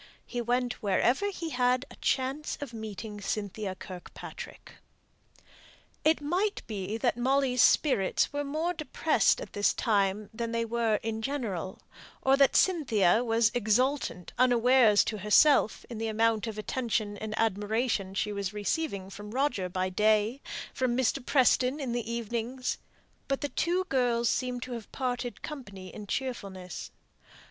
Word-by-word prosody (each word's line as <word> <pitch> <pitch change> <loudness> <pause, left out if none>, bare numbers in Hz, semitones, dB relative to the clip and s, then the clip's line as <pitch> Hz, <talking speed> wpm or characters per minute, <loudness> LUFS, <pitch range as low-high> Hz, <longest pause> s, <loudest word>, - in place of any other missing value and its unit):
He 245 - -3
went 245 +1 -1
wherever 240 - +2
he 335 -4 -5
had 250 +1 +2
a - - -11
chance 270 +3 -1
of 280 -5 -6
meeting 215 -1 -7
Cynthia 200 -1 -3
Kirkpatrick. 185 -1 -10 1.3
It 315 +1 +4
might 370 +8 -1
be 205 -1 -4
that 240 0 0
Molly's 260 0 +2
spirits 260 -4 +3
were 290 0 -1
more 310 +5 -1
depressed 310 +8 +2
at - - -8
this 205 0 +2
time 205 -2 +1
than 230 0 -3
they 230 0 0
were 230 -1 +1
in 220 0 -3
general; 220 - -3 0.4
or 265 0 +5
that 275 -1 +4
Cynthia 235 - +3
was 225 -1 +3
exultant, 245 -3 0
unawares 245 -3 +5
to 215 - -3
herself, 220 +5 +4
in 235 -3 -7
the 225 - -1
amount 225 0 +1
of 220 -1 -5
attention 215 -2 -2
and 215 0 -5
admiration 210 -1 0
she 210 +2 0
was 200 -1 -3
receiving 205 -2 -2
from 205 +1 -9
Roger 245 -6 0
by 185 +1 -1
day, 215 +6 +2 0.3
from 250 -2 0
Mr. 260 +1 +1
Preston 260 +1 +3
in 265 -4 -3
the 235 -1 -2
evening, 235 +2 -3 0.7
but 275 -1 -1
the 290 - -2
two 355 +5 0
girls 245 -8 +1
seemed 250 0 -1
to 255 - -8
have 230 -3 -7
parted 245 -2 -3
company 200 - -8
in 210 -1 -8
cheerfulness. 195 - -4
235 Hz, 145 wpm, -29 LUFS, 210-260 Hz, 1.3 s, or